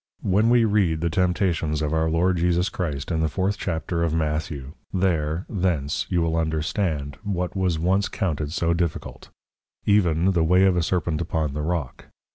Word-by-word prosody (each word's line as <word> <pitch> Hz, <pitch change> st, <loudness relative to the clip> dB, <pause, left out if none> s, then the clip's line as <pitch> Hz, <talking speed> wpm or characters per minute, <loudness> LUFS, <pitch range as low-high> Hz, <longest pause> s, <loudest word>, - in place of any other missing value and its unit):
When 105 Hz, +4 st, +3 dB
we 120 Hz, -1 st, +5 dB
read 95 Hz, -7 st, +1 dB
the 85 Hz, -1 st, 0 dB
Temptations 90 Hz, -4 st, 0 dB
of 75 Hz, +1 st, -1 dB
our 80 Hz, 0 st, +1 dB
Lord 90 Hz, +3 st, +2 dB
Jesus 90 Hz, +2 st, +1 dB
Christ, 75 Hz, -3 st, -4 dB
in 80 Hz, -, 0 dB
the 80 Hz, 0 st, +1 dB
Fourth 100 Hz, +5 st, -1 dB
Chapter 85 Hz, -1 st, -2 dB
of 80 Hz, -1 st, 0 dB
Matthew 75 Hz, -3 st, -2 dB, 0.2 s
There, 85 Hz, -2 st, 0 dB
Thence, 85 Hz, -8 st, -1 dB
you 85 Hz, -2 st, +1 dB
will 80 Hz, 0 st, 0 dB
understand, 80 Hz, -2 st, -1 dB
what 95 Hz, -4 st, -3 dB
was 90 Hz, -4 st, +1 dB
once 95 Hz, +5 st, +1 dB
counted 75 Hz, -5 st, -2 dB
so 85 Hz, 0 st, +1 dB
difficult; 85 Hz, -2 st, -3 dB, 0.6 s
Even, 90 Hz, -3 st, +3 dB
The 85 Hz, -3 st, +2 dB
way 90 Hz, +3 st, +4 dB
of 95 Hz, -2 st, +4 dB
a 85 Hz, -, +2 dB
Serpent 85 Hz, -2 st, -1 dB
upon 80 Hz, -4 st, -1 dB
the 75 Hz, -, -3 dB
Rock. 80 Hz, -5 st, -3 dB
85 Hz, 175 wpm, -24 LUFS, 80-95 Hz, 0.6 s, we